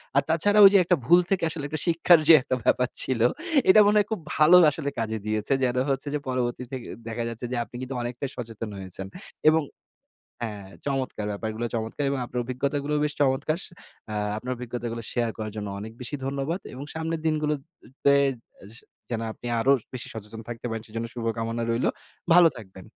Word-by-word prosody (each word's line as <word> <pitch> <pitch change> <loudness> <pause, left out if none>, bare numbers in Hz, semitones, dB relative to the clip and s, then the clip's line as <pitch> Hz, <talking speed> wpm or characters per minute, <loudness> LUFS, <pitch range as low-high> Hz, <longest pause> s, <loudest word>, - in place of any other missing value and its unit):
আর 140 - +6
তাছাড়া 205 +6 +3
ওইযে 200 +1 +8
একটা 180 +1 +3
ভুল 175 +7 +7
থেকে 195 -3 +1
আসলে 155 -2 -4 0.2
শিক্ষার 170 0 +5
যে 165 - +10
একটা 130 0 -1
ব্যাপার 125 - +3 0.2
ছিল, 130 -3 -1 0.5
এটা 200 - +8
মনে 210 +1 +4
হয় 205 - +1
খুব 220 - -1 0.2
ভালো 155 +3 +7 0.2
আসলে 140 0 -3
কাজে 110 -1 -1
দিয়েছে। 110 +4 0
যেন 125 0 +1
হচ্ছে 135 +1 -1
যে 150 - 0
পরবর্তী 125 -1 -1
থে 135 - -5 0.3
দেখা 115 +1 -3
যাচ্ছে 115 +1 -6
যে - - -1
আপনি 120 - -15
কিন্তু 130 +1 -5
অনেকটাই 120 +3 -4
সচেতন 115 -2 -6
হয়েছেন। 95 0 -5 0.4
এবং 160 0 +2 0.8
হ্যাঁ, 105 -4 -6 0.2
চমৎকার! 135 -6 -2
ব্যাপারগুলো 110 +2 -4
চমৎকার! 115 +5 -3
এবং 140 -1 -1
আপনার 125 0 -4
অভিজ্ঞতাগুলোও 140 +4 -1
বেশ 150 -1 0
চমৎকার। 145 +3 +1
সে - - -10 0.4
এ্যা 105 - -3 0.2
আপনার 125 +3 -5
অভিজ্ঞতাগুলো 120 -1 -5
শেয়ার 120 -2 0
করার 110 -1 -4
জন্য 105 -1 -4
অনেক 110 +2 -7
বেশি 125 +4 -4
ধন্যবাদ 140 +6 -2
এবং 130 +2 -7
সামনের 160 0 -3
দিনগুলোতে 150 -2 0 0.5
এস 100 +3 -11 0.4
যেন 115 -2 -2
আপনি 120 - -9
আরো 130 +4 +3 0.2
বেশি 125 - -5
সচেতন 110 0 -7
থাকতে 120 0 -7
পারেন, 115 -1 -4
সেজন্য 115 +1 -4
শুভকামনা 115 0 -2
রইলো। 115 +1 +1 0.4
ভালো 175 0 +8
থাকবেন। 95 -4 -12
125 Hz, 180 wpm, -26 LUFS, 115-150 Hz, 0.8 s, যে